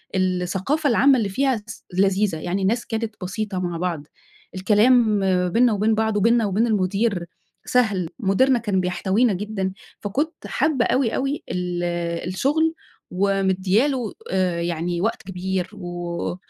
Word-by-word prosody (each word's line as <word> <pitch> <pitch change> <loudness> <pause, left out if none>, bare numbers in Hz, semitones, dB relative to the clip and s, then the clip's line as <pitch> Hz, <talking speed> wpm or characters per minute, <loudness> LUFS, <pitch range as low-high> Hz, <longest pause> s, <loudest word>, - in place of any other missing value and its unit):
الثقافة 185 - 0
العامة 265 +3 +5
اللي 205 -4 0
فيها 265 +3 +1
س - - -10
لذيذة، 195 -2 +2
يعني 180 +5 -2
الناس 225 +5 0
كانت 225 -1 -3
بسيطة 200 0 -3
مع 175 -2 -3
بعض، 165 -4 -3 0.5
الكلام 215 +2 +4 0.3
بيننا 235 +3 +3
وبين 215 +2 +2
بعض 220 -1 0
وبيننا 230 +2 +3
وبين 210 +4 +1
المدير 195 -2 0 0.4
سهل، 205 -9 +1
مديرنا 240 +5 +3
كان 205 -4 0
بيحتوينا 195 +5 +1
جدًا، 195 -1 -3 0.3
فكُنت 290 - -3
حابّة 280 -5 +1
أوي، 255 -4 +1
أوي 275 +2 -2
ال 180 -1 -2 0.5
الشغل 315 +9 +1 0.4
ومدّية 195 +4 +2
له 250 -7 -2 0.2
آآ، 180 -3 0
يعني 170 +1 -2
وقت 225 +3 -1
كبير 185 -1 -3
و 175 -2 -4
200 Hz, 135 wpm, -22 LUFS, 185-235 Hz, 0.5 s, العامة